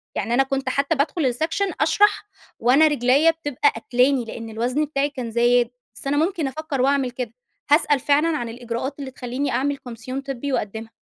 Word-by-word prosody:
يعني 230 Hz, -, -1 dB
أنا 270 Hz, +3 st, +4 dB
كنت 270 Hz, 0 st, -2 dB
حتّى 280 Hz, +5 st, +1 dB
بادخل 295 Hz, +2 st, 0 dB
السيكشن 325 Hz, +10 st, 0 dB
أشرح 325 Hz, +7 st, +3 dB, 0.4 s
وأنا 270 Hz, +7 st, +5 dB
رجليّا 285 Hz, +3 st, +4 dB
بتبقى 290 Hz, -5 st, 0 dB
قاتلاني 250 Hz, +3 st, +1 dB
لإن 225 Hz, 0 st, -7 dB
الوزن 250 Hz, +7 st, -1 dB
بتاعي 280 Hz, -1 st, -1 dB
كان 255 Hz, -5 st, -6 dB
زايد. 240 Hz, +1 st, +3 dB, 0.3 s
بس 265 Hz, -, -7 dB
أنا 285 Hz, +1 st, +1 dB
ممكن 325 Hz, -2 st, 0 dB
أفكّر 290 Hz, -1 st, -3 dB
واعمل 270 Hz, -2 st, +2 dB
كده. 240 Hz, -2 st, -5 dB, 0.4 s
هاسأل 290 Hz, -2 st, +4 dB
فعلًا 300 Hz, +4 st, +2 dB
عن 235 Hz, -3 st, -4 dB
الإجراءات 240 Hz, +4 st, -5 dB
اللي 265 Hz, -2 st, -6 dB
تخلّيني 255 Hz, +2 st, -3 dB
أعمل 280 Hz, +4 st, 0 dB
كومسيون 255 Hz, 0 st, -7 dB
طبّي 275 Hz, 0 st, -4 dB
واقدِّمها. 220 Hz, 0 st, -3 dB
270 Hz, 175 wpm, -22 LUFS, 245-290 Hz, 0.4 s, وأنا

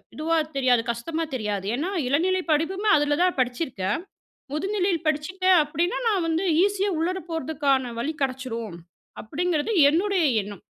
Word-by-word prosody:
இதுவா 320 Hz, +2 st, 0 dB, 0.2 s
தெரியாது 250 Hz, -3 st, +3 dB
கஷ்டமா 315 Hz, +8 st, -3 dB
தெரியாது. 210 Hz, -5 st, -3 dB
ஏனா 310 Hz, +8 st, -2 dB, 0.2 s
இளநிலை 360 Hz, +8 st, +1 dB
படிப்புமே 380 Hz, +7 st, +1 dB
அதுல 290 Hz, 0 st, +1 dB
தான் 365 Hz, -4 st, +1 dB
படிச்சிருக்கேன்."முதுநிலையில் 320 Hz, -, -3 dB
படிச்சிட்டேன் 370 Hz, +5 st, +2 dB
அப்டின்னா, 325 Hz, +5 st, -1 dB
நான் 385 Hz, -6 st, +1 dB
வந்து 330 Hz, +2 st, 0 dB, 0.2 s
ஈஸியா 400 Hz, 0 st, +1 dB
உள்ளர 365 Hz, +3 st, -1 dB
போறதுக்கான 280 Hz, -5 st, 0 dB
வழி 285 Hz, +7 st, -2 dB
கெடைச்சிரும்" 250 Hz, -7 st, -3 dB, 0.4 s
அப்டிங்கிறது 315 Hz, -, -1 dB, 0.2 s
என்னுடைய 370 Hz, +3 st, +1 dB, 0.2 s
எண்ணம். 200 Hz, -1 st, -9 dB
310 Hz, 125 wpm, -24 LUFS, 255-365 Hz, 0.4 s, தெரியாது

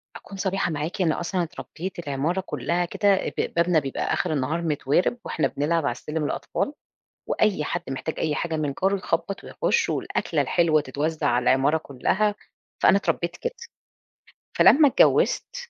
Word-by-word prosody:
أكون 195 Hz, -, -10 dB
صريحة 190 Hz, -2 st, -1 dB
معاكِ، 155 Hz, +5 st, -3 dB
إن 170 Hz, -3 st, +3 dB
أصلًا 175 Hz, +2 st, -1 dB
اتربيت 175 Hz, +2 st, -7 dB
العمارة 155 Hz, +4 st, -1 dB
كلها 170 Hz, +6 st, -1 dB
كده، 200 Hz, +3 st, +2 dB, 0.2 s
ب -, -, +2 dB
بابنا 170 Hz, -1 st, +3 dB
بيبقى 135 Hz, -2 st, -2 dB
آخر -, -, 0 dB
النهار 150 Hz, +4 st, -1 dB
متوارِب، 160 Hz, -, +1 dB
وإحنا 155 Hz, -, 0 dB
بنلعب 155 Hz, +2 st, 0 dB
على 140 Hz, -, +1 dB
السلم 150 Hz, +6 st, -4 dB
الأطفال، 280 Hz, -, -2 dB, 0.6 s
وأي 200 Hz, -8 st, +1 dB
حد -, -, -2 dB
محتاج 135 Hz, +4 st, -4 dB
أي 155 Hz, -2 st, 0 dB
حاجة 165 Hz, +1 st, -2 dB
من 145 Hz, -3 st, -2 dB
جاره 195 Hz, +1 st, +3 dB
يخبط 180 Hz, +1 st, -3 dB
ويخش، -, -, 0 dB
والأكلة -, -, -1 dB
الحلوة 165 Hz, -3 st, +3 dB
تتوزع 150 Hz, +2 st, -2 dB
على 125 Hz, -2 st, +2 dB
العمارة 135 Hz, +5 st, +3 dB
كلّها، 195 Hz, +10 st, 0 dB, 0.5 s
فأنا 190 Hz, -, +6 dB
اتربيت 170 Hz, -3 st, -1 dB
كده. 485 Hz, -, -3 dB, 1.1 s
فلمّا 295 Hz, 0 st, +7 dB
اتجوزت 385 Hz, -, +3 dB
165 Hz, 155 wpm, -24 LUFS, 150-185 Hz, 1.1 s, فلمّا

